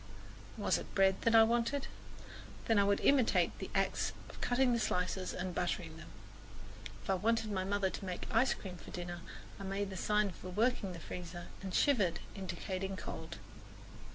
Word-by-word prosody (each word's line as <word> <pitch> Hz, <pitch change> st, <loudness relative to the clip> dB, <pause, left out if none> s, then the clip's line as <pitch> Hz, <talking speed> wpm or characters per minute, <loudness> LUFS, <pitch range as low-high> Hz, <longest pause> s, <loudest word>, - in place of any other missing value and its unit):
Was -, -, +2 dB
it -, -, -10 dB
bread 190 Hz, -1 st, +4 dB
that 230 Hz, 0 st, +4 dB
I 225 Hz, -, +10 dB
wanted? 240 Hz, +5 st, +1 dB, 0.8 s
Then 225 Hz, -2 st, +4 dB
I -, -, +6 dB
would 200 Hz, 0 st, +2 dB
imitate 265 Hz, -5 st, +4 dB
the -, -, -5 dB
acts -, -, +1 dB, 0.2 s
of -, -, -13 dB
cutting 250 Hz, 0 st, +3 dB
the 235 Hz, -, +2 dB
slices 185 Hz, -2 st, 0 dB
and 180 Hz, 0 st, -3 dB
buttering 170 Hz, -2 st, -2 dB
them. 160 Hz, -, -10 dB, 1.0 s
If -, -, -12 dB
I 195 Hz, -, +3 dB
wanted 220 Hz, +3 st, +1 dB
my 190 Hz, -2 st, 0 dB
mother 195 Hz, 0 st, +1 dB
to -, -, -6 dB
make 180 Hz, -1 st, -4 dB
ice 235 Hz, +3 st, +4 dB
cream 185 Hz, -3 st, -8 dB
for -, -, -12 dB
dinner 175 Hz, -1 st, -5 dB, 0.4 s
I -, -, -6 dB
made 195 Hz, +1 st, -2 dB
the 190 Hz, -, -5 dB
sign 210 Hz, +1 st, +2 dB
for 185 Hz, -, -9 dB
working 210 Hz, -1 st, +1 dB
the 170 Hz, -, -7 dB
freezer 175 Hz, +1 st, -7 dB
and 190 Hz, -1 st, -5 dB
shivered, 200 Hz, -, +3 dB
indicating 190 Hz, 0 st, -4 dB
cold. 160 Hz, +1 st, -6 dB
195 Hz, 180 wpm, -34 LUFS, 180-225 Hz, 1.0 s, I